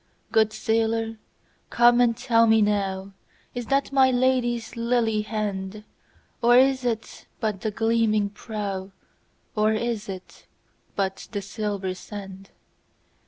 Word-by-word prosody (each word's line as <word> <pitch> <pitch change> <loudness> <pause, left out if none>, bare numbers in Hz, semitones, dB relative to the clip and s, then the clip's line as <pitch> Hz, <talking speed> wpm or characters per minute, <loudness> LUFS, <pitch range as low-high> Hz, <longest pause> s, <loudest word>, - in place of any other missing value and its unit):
Good 220 -1 +4
sailor 225 0 0 0.5
come 240 0 +5
and 235 -2 +3
tell 230 -3 +3
me 220 -1 +5
nowIs 200 +3 -4
that 275 0 +1
my 265 -1 +5
Lady's 245 -2 +1
lily 230 -2 +1
hand? 210 -1 -4 0.6
Or 240 +1 +6
is 265 0 +4
it 230 -2 -4
but 210 -4 -2
the 220 - -1
gleaming 215 -1 +1
prow, 200 -3 -5 0.6
Or 215 0 +3
is 225 -2 -2
it 185 -1 -9 0.5
but 195 -1 -2
the 205 - -2
silver 200 -2 -3
sand? 195 0 -9
220 Hz, 120 wpm, -25 LUFS, 205-235 Hz, 0.6 s, Or